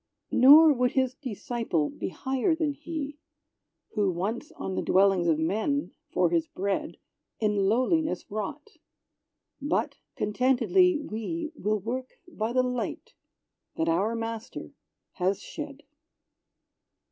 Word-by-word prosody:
Nor 295 Hz, +5 st, +8 dB
would 250 Hz, -1 st, +1 dB
his 260 Hz, -1 st, +1 dB
disciple 230 Hz, -, -2 dB
be -, -, -4 dB
higher 265 Hz, -, 0 dB
than 315 Hz, -3 st, 0 dB
He, 295 Hz, -2 st, -6 dB, 0.7 s
Who 205 Hz, -3 st, +1 dB
once 210 Hz, -, -3 dB
on 190 Hz, -, -5 dB
the -, -, -1 dB
dwellings 190 Hz, -2 st, +3 dB
of 160 Hz, -2 st, +3 dB
men, 220 Hz, -, 0 dB, 0.2 s
for -, -, +2 dB
his 330 Hz, -2 st, +1 dB
bread, 200 Hz, -8 st, -3 dB, 0.4 s
In 210 Hz, -3 st, +2 dB
lowliness 310 Hz, -, +1 dB
wrought! 215 Hz, -, -4 dB, 0.9 s
but 290 Hz, +3 st, -1 dB, 0.2 s
contentedly, 265 Hz, -, +3 dB
we 300 Hz, +5 st, -4 dB
Will 215 Hz, -7 st, -1 dB
work 255 Hz, +6 st, -5 dB
by 225 Hz, -10 st, -3 dB
the 255 Hz, +1 st, +3 dB
light 250 Hz, -2 st, -3 dB, 0.6 s
that 160 Hz, -, -1 dB
our 195 Hz, +8 st, +1 dB
Master 230 Hz, +1 st, -5 dB, 0.5 s
has 190 Hz, +2 st, +1 dB
shed. 295 Hz, +3 st, -8 dB
245 Hz, 120 wpm, -27 LUFS, 205-290 Hz, 0.9 s, Nor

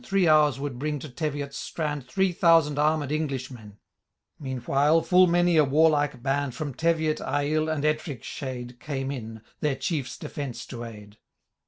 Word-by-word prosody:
Three 195 Hz, -6 st, +2 dB
hours 150 Hz, -4 st, +4 dB
would 140 Hz, -3 st, -4 dB
bring 150 Hz, +1 st, -1 dB
to 150 Hz, +2 st, -8 dB
Teviot'd 140 Hz, +1 st, -4 dB
strand 145 Hz, -3 st, -4 dB
Three 190 Hz, +6 st, +1 dB
thousand 165 Hz, -4 st, +4 dB
armed 150 Hz, -1 st, +1 dB
Englishmen 130 Hz, -8 st, -4 dB, 0.3 s
— -, -, -54 dB
Meanwhile, 140 Hz, +4 st, +1 dB
full 185 Hz, 0 st, +5 dB
many 175 Hz, -1 st, +3 dB
a 155 Hz, -, +7 dB
warlike 145 Hz, -3 st, +2 dB
band. 140 Hz, -1 st, -1 dB
From 145 Hz, -1 st, -4 dB
Teviot, 160 Hz, 0 st, +1 dB
Aill, 145 Hz, +3 st, 0 dB
and 150 Hz, -2 st, -1 dB
Ettrick 155 Hz, -5 st, -1 dB
shade. 125 Hz, -2 st, -6 dB
Came 135 Hz, -1 st, -3 dB
in, 115 Hz, -4 st, -7 dB, 0.2 s
their 150 Hz, -3 st, 0 dB
Chiers 135 Hz, 0 st, -3 dB
defence 125 Hz, -5 st, -6 dB
to 120 Hz, -2 st, -7 dB
aid. 105 Hz, -2 st, -11 dB
145 Hz, 160 wpm, -26 LUFS, 130-155 Hz, 0.3 s, a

